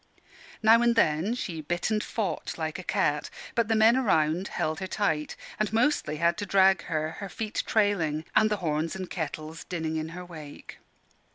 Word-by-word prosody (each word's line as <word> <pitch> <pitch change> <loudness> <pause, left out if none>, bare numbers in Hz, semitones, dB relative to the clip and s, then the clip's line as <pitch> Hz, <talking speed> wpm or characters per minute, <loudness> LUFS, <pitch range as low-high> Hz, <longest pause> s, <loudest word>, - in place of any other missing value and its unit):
Now 225 +2 +7
and 235 0 +3
then 175 +2 +2
she 170 -10 -4
bit 175 +7 -2
and 215 -1 +1
fought 215 -6 -3
like 160 +1 -3
a - - -7
cat: 150 -3 0 0.2
but 235 -2 +1
the 225 - +2
men 220 +2 +6
around 180 -7 +2
held 155 0 -2
her 190 - -4
tight, 160 -7 -1 0.2
and 215 -1 0
mostly 230 - +1
had 170 +2 +2
to 205 - -2
drag 190 0 +4
her, 155 -1 -1
her 200 - -5
feet 215 +5 -3
trailing, 170 -8 +1
and 215 - +5
the 210 - 0
horns 155 +2 -1
and 190 -1 -5
kettles 160 -1 -5
dinning 160 -3 -3
in 155 0 -3
her 180 - -7
wake. 155 -4 -11
180 Hz, 185 wpm, -27 LUFS, 155-215 Hz, 0.2 s, Now